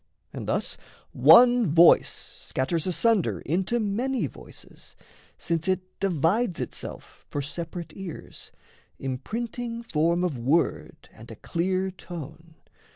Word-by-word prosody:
And - - -6
thus - - -1 0.3
one 245 -2 +7
voice 165 +3 +6 0.3
Scatters 160 +6 -2
asunder 180 - +1
into 190 - 0
many 235 +5 -1
voices, - - -12 0.4
Since 165 0 -2
it 185 0 -2
divides 185 - +1
itself - - -7
for 145 - -3
separate 170 +3 -6
ears, 190 -5 -8 0.5
Imprinting 230 - -4
form 170 -3 +1
of 155 -9 -1
word 145 +8 0
and - - -14
a - - -8
clear 185 +2 -1
tone. 165 -2 -10
180 Hz, 110 wpm, -26 LUFS, 160-215 Hz, 0.5 s, one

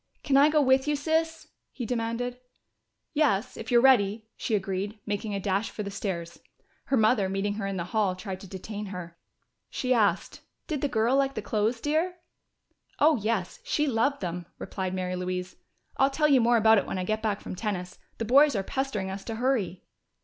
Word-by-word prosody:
"Can 275 - +1
I 285 +2 +7
go 300 -1 +3
with 265 +1 +3
you, 295 - +2
Sis?" 320 +2 -1 0.2
he 245 - -5
demanded. 245 +1 -2 0.7
"Yes, 255 -7 +1
if 225 - -7
you're 240 -1 +5
ready," 220 -5 +4
she 225 - -1
agreed, 195 +1 -2
making 205 0 -3
a - - -1
dash 195 +2 0
for 210 - -5
the 200 - -5
stairs. 175 -4 -4 0.5
Her 270 - +1
mother, 215 -3 +3
meeting 195 +1 -1
her 205 -1 -3
in 195 -1 -3
the 170 - -2
hall, 205 -4 +2
tried 185 0 -6
to 195 - -11
detain 205 +3 -6
her. 175 -3 -8 0.5
She 255 0 0
asked, 205 -6 +1 0.3
"Did 300 -4 -3
the 290 - +1
girl 235 0 +2
like 275 0 +1
the 215 - -4
clothes, 220 +3 0
dear?" 315 +7 0 0.8
"Oh, 305 0 +5
yes, 215 -4 -2
she 300 - 0
loved 275 +2 +1
them," 175 -2 -4
replied 185 -1 -4
Mary 185 -1 -2
Louise. 180 0 -4 0.4
"I'll 270 - +4
tell 300 +2 +2
you 275 -4 +5
more 235 +1 +4
about 220 -1 +6
it - - -5
when - - -3
I 185 - -1
get 215 +3 -1
back 210 -2 -1
from - - -7
tennis. 185 -3 -4 0.2
The 225 - -2
boys 280 +4 +5
are 195 - 0
pestering 210 -5 -2
us 195 0 -6
to 225 - -4
hurry." 220 -7 -1
220 Hz, 200 wpm, -27 LUFS, 195-265 Hz, 0.8 s, I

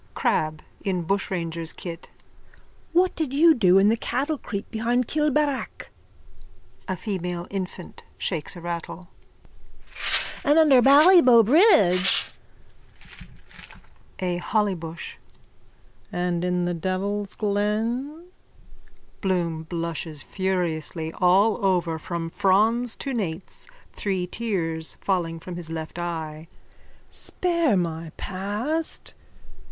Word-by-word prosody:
CRAB: 155 0 0 0.2
(In 185 -3 -1
bushranger's 170 -3 -2
kit.) 170 -2 -8 0.8
What 360 +2 +3
did 315 -6 -2
you 325 +3 +6
do 190 -9 +4
in 195 +2 +5
the 225 - +3
cattlecreep 255 -5 -3
behind 240 +2 0
Kilbarrack? 300 -2 -1 1.0
A 185 - -1
FEMALE 180 -3 -4
INFANT: 185 -2 -6
(Shakes 165 0 -2
a 175 - -9
rattle.) 170 +1 -6 1.3
And 290 +2 +4
under 290 -6 +6
Ballybough 275 - +7
bridge? 205 - +5 1.9
A 180 -2 -1
HOLLYBUSH: 175 -4 -2 0.9
And 175 -1 -1
in 180 0 0
the 175 - -1
devil's 190 +4 -2
glen? 225 +9 -1 1.0
BLOOM: 170 -5 -1
(Blushes 165 -3 -4
furiously 170 -4 -2
all 195 +4 +4
over 175 -4 +1
from 170 +1 -4
frons 220 +6 +2
to 275 - -4
nates, 190 - -4 0.3
three 190 -3 -2
tears 175 -6 -3
falling 170 -4 -1
from 175 +1 -8
his 170 -2 -6
left 160 +1 -6
eye.) 160 -2 -5 0.6
Spare 335 - 0
my 165 -2 -3
past. 210 - -3
190 Hz, 100 wpm, -24 LUFS, 170-235 Hz, 1.9 s, Ballybough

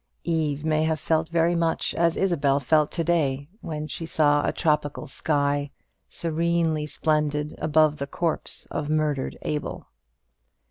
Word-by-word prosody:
Eve 155 -3 -1
may 155 -1 +2
have 160 -1 0
felt 160 +1 0
very 170 0 +2
much 170 -1 0
as 170 -1 +2
Isabel 145 -7 +2
felt 150 +2 +3
to 170 - 0
day, 145 -5 +1
when 155 -2 -4
she 165 +1 -6
saw 145 -2 +3
a - - +1
tropical 150 -3 0
sky, 145 0 0 0.4
serenely 165 -1 0
splendid, 150 -1 0
above 155 -1 +3
the 140 -1 -4
corpse 165 +2 -2
of 150 - -3
murdered 155 -3 0
Abel. 150 -1 -4
155 Hz, 140 wpm, -25 LUFS, 145-165 Hz, 0.4 s, felt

